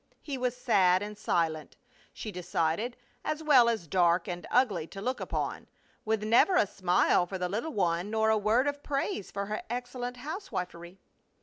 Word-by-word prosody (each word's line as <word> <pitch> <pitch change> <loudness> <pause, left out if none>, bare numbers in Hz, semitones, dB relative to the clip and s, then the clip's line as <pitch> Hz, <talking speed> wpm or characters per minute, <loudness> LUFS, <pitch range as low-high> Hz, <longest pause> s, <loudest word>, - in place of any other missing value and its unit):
He 285 - -4
was 250 -1 -2
sad 190 -6 +3
and 210 0 -6
silent, 160 -5 -1 0.4
she 215 - -7
decided, 180 +5 -1 0.3
as 310 +1 -3
well 260 -6 +6
as 220 -7 -1
dark 175 0 +2
and 175 -1 -5
ugly 205 -11 +2
to 195 - -9
look 255 +6 -2
upon, - - -3 0.4
with 220 -1 0
never 235 - +4
a 360 - +5
smile 180 -2 +2
for 190 - -4
the 180 -1 -1
little 225 - -3
one 175 0 0
nor 220 0 +2
a - - +4
word 220 +5 +2
of 285 0 -2
praise 275 -9 -2
for 200 0 -3
her 215 +2 -3
excellent 245 0 -4
housewifery. 185 - -6
210 Hz, 175 wpm, -29 LUFS, 180-250 Hz, 0.4 s, well